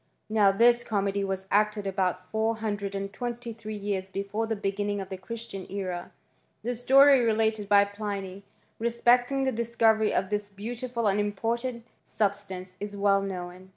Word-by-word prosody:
Now 210 -2 +5
this 235 +4 +4
comedy 200 -2 0
was 190 -1 -3
acted 210 0 +2
about 185 -2 -1
four 220 +1 +1
idred 205 -2 -3
and 195 0 -4
twenty 240 -1 -5
three 215 -1 -7
years 200 -2 -3
before 200 +3 -3
the 225 - -1
beginning 205 0 -2
the 190 -1 -5
Christian 200 0 -6
era. 185 -3 -4 0.5
The 245 - -1
story 270 +3 +6
related 220 -2 +1
by 200 -1 +6
Pliuy, 200 -2 -5 0.4
re 235 +1 +1
cting 245 +3 +3
the 265 - +2
discovery 225 -2 +2
of 190 +1 -1
this 205 0 -1
beautiful 235 +4 -4
and 200 0 +2
important 230 +4 -2 0.2
•stance, 195 -3 -2
is 205 0 -5
well 200 0 +3
known. 185 -1 -6
205 Hz, 155 wpm, -27 LUFS, 195-230 Hz, 0.5 s, story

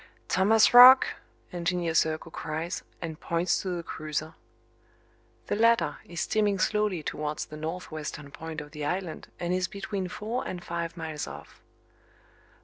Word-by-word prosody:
"Thomas 215 +5 +4
Roch!" 255 +2 +11 0.5
Engineer 175 -1 -1
Serko 160 0 +1
cries, 160 +2 -4 0.2
and 160 -2 -5
points 170 +2 0
to 190 - -4
the 175 -2 -3
cruiser. 155 0 -4 1.1
The - - -1
latter 225 -8 +3
is 170 -1 -5
steaming 205 0 +1
slowly 205 -3 0
towards 150 0 -3
the 155 - -10
northwestern 155 -3 -6
point 160 0 -6
of 150 - -11
the 150 -1 -6
island 180 +1 -3
and 175 +1 -1
is 185 -1 0
between 195 0 -4
four 215 +6 -4
and 175 -1 -6
five 170 0 -4
miles 160 -2 -4
off. - - -11
170 Hz, 140 wpm, -28 LUFS, 155-195 Hz, 1.1 s, Roch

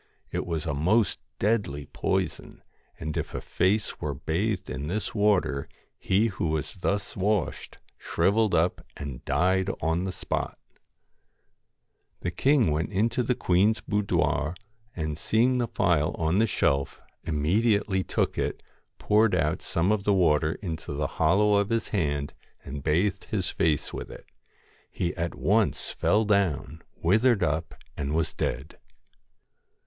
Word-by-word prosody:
It - - -3
was 80 -3 -2
a - - -1
most 95 +8 +2 0.2
deadly 100 -10 0
poison, - - -3 0.4
and 80 -1 -4
if - - -3
a - - -1
face 100 +4 0
were - - -2
bathed 95 +4 -1
in 65 +4 -4
this 100 +6 -2
water, 100 -10 +1 0.3
he 100 +4 +2
who 95 -6 -1
was 75 -1 -2
thus 100 +2 -2
washed, 100 -2 -1 0.2
shrivelled 105 -1 +2
up, 85 +2 +1
and 70 -4 -6
died 95 +6 +2
on 80 +3 0
the 95 - -2
spot - - -3 1.6
The 90 - -2
king 130 - +3
went 80 +5 -1
into 115 +5 +1
the 125 +1 +1
queen's 100 +5 +2
boudoir, 90 -6 0 0.4
and 75 -2 -3
see 110 +6 +2
ing 125 0 +2
the 120 - 0
phial 85 -6 +1
on 80 +4 +1
the 115 - +4
shelf, 70 -8 0 0.2
immediately 95 +5 +1
took - - -1
it, - - -2
E - - -25
cured 105 -2 +4
out 80 0 0
some 85 +4 0
of 105 -2 +1
the 100 0 +3
water 80 -3 +3
into 80 -4 -4
the 75 +1 -1 0.2
hollow 100 +6 +4
of 100 +1 0
is 115 -1 0
hand 75 -7 -1 0.3
and 70 +1 -6
bathed 90 +7 +1
his 95 -4 -1
face 75 -4 0
with - - -6
it - - -11 0.6
He 85 0 -2
at 85 -1 -3
once 105 +1 +1
fell 110 +2 +2
down, 90 -6 0
withered 110 +4 +3
up, 80 +1 -1 0.2
and 75 +1 -2
was 80 -1 0
dead. 65 +1 -4
90 Hz, 150 wpm, -27 LUFS, 80-105 Hz, 1.6 s, the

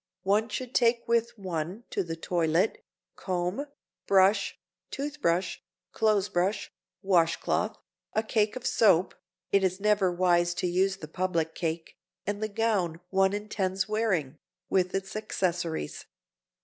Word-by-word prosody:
One 210 +4 +2
should 255 -1 -5
take 235 -1 +3
with 235 0 +1
one 185 +2 -4
to 200 - 0
the 165 -2 -4
toilet 165 +3 0 0.3
comb, 185 +9 -2 0.4
brush, 195 +1 +4 0.3
tooth 290 +1 -5
brush, 175 -1 0 0.3
clothes 215 -3 +2
brush, 185 +4 -1 0.3
wash 170 -4 +3
cloth, - - -1 0.4
a 220 - +1
cake 215 -1 +1
of 255 - -6
soap 190 -5 +4 0.4
(it 200 -1 +4
is 185 0 +1
never 205 -2 +3
wise 175 -1 +2
to - - -2
use 190 +2 +1
the 155 - -8
public 165 -1 -1
cake) 165 -1 -4 0.3
and 205 +1 -2
the 215 - 0
gown 200 -6 0
one 190 0 +3
intends 195 -2 -1
wearing, 190 -10 0 0.3
with 185 -1 +2
its 195 +1 -3
accessories. 175 - -2
190 Hz, 135 wpm, -28 LUFS, 175-215 Hz, 0.4 s, brush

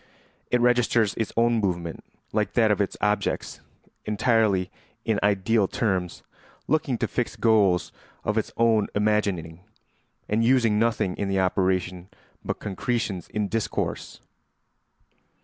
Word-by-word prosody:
It 125 - +2
registers 120 -3 +3
its 110 - -3
own 115 0 +3
movement, 85 -4 -3 0.3
like - - 0
that - - +3
of - - +1
its - - -2
objects, - - -1 0.4
entirely 105 -4 +1 0.3
in 110 -2 +1
ideal 100 +1 +2
terms, 95 -6 -2 0.4
looking 145 -5 +1
to - - -1
fixed 120 - -3
goals 105 -6 +3 0.3
of 105 - -1
its 110 - -1
own 115 -2 +3
imagining, 100 -6 0 0.7
and 110 +2 +1
using 115 -4 +3
nothing 110 -5 +1
in 100 - -2
the 95 0 +1
operation 95 -1 0 0.3
but - - -3
concretions 105 -3 -3
in 105 -1 -2
discourse. 110 +1 -3
105 Hz, 125 wpm, -25 LUFS, 95-115 Hz, 0.7 s, registers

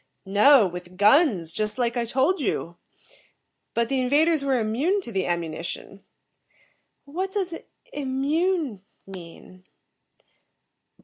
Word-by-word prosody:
"No, 210 +5 +6
with 180 0 -7
guns, 205 - +4
just 215 +1 -2
like 240 -1 0
I 240 -1 0
told 270 +9 +1
you. 170 -8 -2 1.0
But 235 0 +1
the 270 +1 0
invaders 295 +4 +2
were 270 -2 +1
immune 260 - 0
to 235 - -8
the 190 -3 -1
ammunition." 170 +3 -4 1.0
"What 365 +7 -4
does 375 -4 -2 0.4
'immune' 290 - -1 0.2
mean?" 185 0 -12
240 Hz, 110 wpm, -25 LUFS, 195-290 Hz, 1.0 s, No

